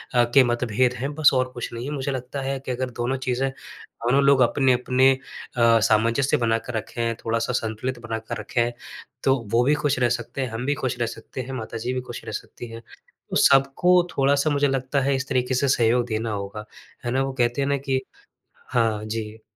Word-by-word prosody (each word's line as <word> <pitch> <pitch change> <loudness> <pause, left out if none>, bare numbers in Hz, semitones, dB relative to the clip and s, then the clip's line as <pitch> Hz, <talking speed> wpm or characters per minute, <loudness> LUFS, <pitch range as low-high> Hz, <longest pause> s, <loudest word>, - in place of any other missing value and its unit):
अ, 120 - +6
के 130 +3 +5
मतभेद 120 +1 +1
हैं 140 +4 -3
बस 155 -1 +6
और 130 -1 +1
कुछ 120 - -5
नहीं 120 +2 -5
है। 145 - -4
मुझे 140 0 -2
लगता 130 +2 -4
है 135 0 -2
कि 130 -1 -5
अगर 130 +1 -2
दोनों 130 +3 0
चीज़ें 130 +2 +1
दोनों 130 0 -3
लोग 140 -2 +5
अपने-अपने 130 0 +3
अ, 115 -3 +1
सामंजस्य 115 +5 +3
बनाकर 115 0 -1
रखें, 115 +1 -2
थोड़ा-सा 115 +2 0
संतुलित 115 +2 -2
बनाकर 110 0 -4
रखे - - -3
हैं। 120 0 0 0.5
तो 135 0 +4 0.2
वो 120 +1 +4
भी 145 +4 +3
ख़ुश 145 -4 0
रह 120 - +3
सकते 120 +4 -6
हैं, 130 - -2
हम 115 +2 -4
भी 145 +1 +1
ख़ुश 125 -1 -1
रह 120 - +1
सकते 115 +3 -7
हैं, 130 +2 -7
माता 115 -3 -5
जी 120 +3 -3
भी 130 - -2
ख़ुश - - -7
रह - - -5
सकती 120 - -7
हैं। 115 0 -8 0.5
तो - - -4
सबको 140 +7 +5 0.2
थोड़ा-सा 140 +2 +3
मुझे 145 0 +2
लगता 135 +1 0
है 135 +1 +1
इस 130 +1 -3
तरीके 130 -1 0
से 140 +2 +1
सहयोग 120 -1 +3
देना 110 -1 -2
होगा। 100 +1 -5 0.4
है 120 - -1
ना? 130 - +1
वो 135 - -3
कहते 120 +1 +1
हैं 135 - 0
ना 140 - +2
कि 135 -1 -1 0.7
हाँ 110 -4 +1
जी। 110 0 -5
125 Hz, 210 wpm, -24 LUFS, 115-135 Hz, 0.7 s, अ